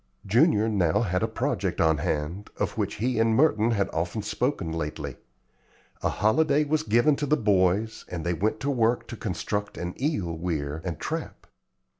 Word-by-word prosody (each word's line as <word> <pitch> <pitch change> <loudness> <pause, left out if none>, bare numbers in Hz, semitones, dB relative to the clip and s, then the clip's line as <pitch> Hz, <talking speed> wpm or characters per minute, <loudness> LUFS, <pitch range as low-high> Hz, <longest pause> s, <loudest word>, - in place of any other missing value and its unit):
Junior 110 - +4
now 100 -2 +2
had 90 -5 0
a 115 - +1
project 110 -5 -2
on 80 -2 +3
hand, 85 +4 -2
of - - -2
which - - -2
he 120 +2 0
and 115 0 +3
Merton 115 -5 +3
had 100 -4 +1
often 90 +6 -2
spoken 110 - -1
lately. 75 -4 -4 0.9
A - - +1
holiday 140 +8 +2
was 150 +1 +1
given 120 +7 +3
to 145 - -2
the 150 - +3
boys 105 +1 +1
and 85 -2 -5
they 85 - +1
went 105 +6 -1
to 140 - 0
work 120 -2 +1
to - - -5
construct 105 0 -3
an 90 0 -4
eel 100 - -1
weir 80 -3 -3
and 85 -4 -4
trap. - - -5
105 Hz, 175 wpm, -26 LUFS, 85-120 Hz, 0.9 s, Junior